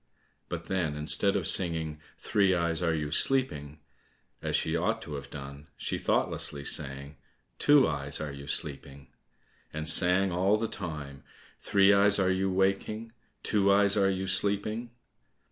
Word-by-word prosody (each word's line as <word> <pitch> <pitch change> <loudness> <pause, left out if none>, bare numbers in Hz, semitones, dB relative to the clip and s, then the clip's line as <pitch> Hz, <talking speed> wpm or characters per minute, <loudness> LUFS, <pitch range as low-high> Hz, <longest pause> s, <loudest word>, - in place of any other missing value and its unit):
but - - -6
then, 85 -6 -2
instead 80 +7 +5
of 95 -5 -1
singing, 80 -4 +2 0.2
"Three 100 -3 +1
eyes, 85 0 -1
are 85 -2 0
you 75 -1 -4
sleeping?" 75 - +1 0.6
as - - -2
she - - 0
ought - - -1
to - - -9
have 70 -1 -7
done, 70 +2 -10
she - - -4
thoughtlessly 70 -1 -2
sang, 70 0 -2 0.4
"Two 145 -3 +5
eyes, 70 -2 -3
are 75 -2 -5
you 70 0 -10
sleeping?" 70 -2 -4 0.6
and 80 0 -6
sang 90 +2 +3
all 95 +4 +1
the 115 +1 -2
time, 75 -9 -7 0.4
"Three 100 0 +3
eyes, 100 0 +4
are 95 -1 +1
you 95 +1 -1
waking? 100 +4 -1 0.3
Two 100 -2 +2
eyes, 100 0 +3
are 100 -2 +2
you 95 0 -3
sleeping?" 100 +4 -1
90 Hz, 150 wpm, -28 LUFS, 75-100 Hz, 0.6 s, instead